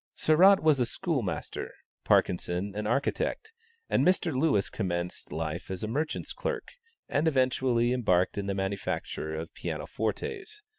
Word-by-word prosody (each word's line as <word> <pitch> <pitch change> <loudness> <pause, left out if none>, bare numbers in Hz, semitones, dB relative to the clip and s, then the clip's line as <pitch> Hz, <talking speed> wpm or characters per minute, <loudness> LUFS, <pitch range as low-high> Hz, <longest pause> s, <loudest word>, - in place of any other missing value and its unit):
Sarratt 185 +6 +6
was 155 -3 +4
a 125 - +3
schoolmaster, 120 - -3 0.3
Parkinson 90 +2 +1
an 105 0 -2
architect, 150 - -1 0.3
and - - +2
Mr. 180 -4 +2
Lewis 130 -8 +2
commenced 90 -3 -3
life 80 +2 -4
as 95 +1 -4
a - - -1
merchant's 150 +7 -2
clerk, - - -3 0.4
and 150 +3 +1
eventually 130 -3 +2
embarked 90 -8 +2
in 100 -1 -3
the 100 - -1
manufacture 95 -5 -3
of 80 +1 -6
piano - - -4
fortes. 390 - -4
115 Hz, 140 wpm, -29 LUFS, 95-155 Hz, 0.4 s, Sarratt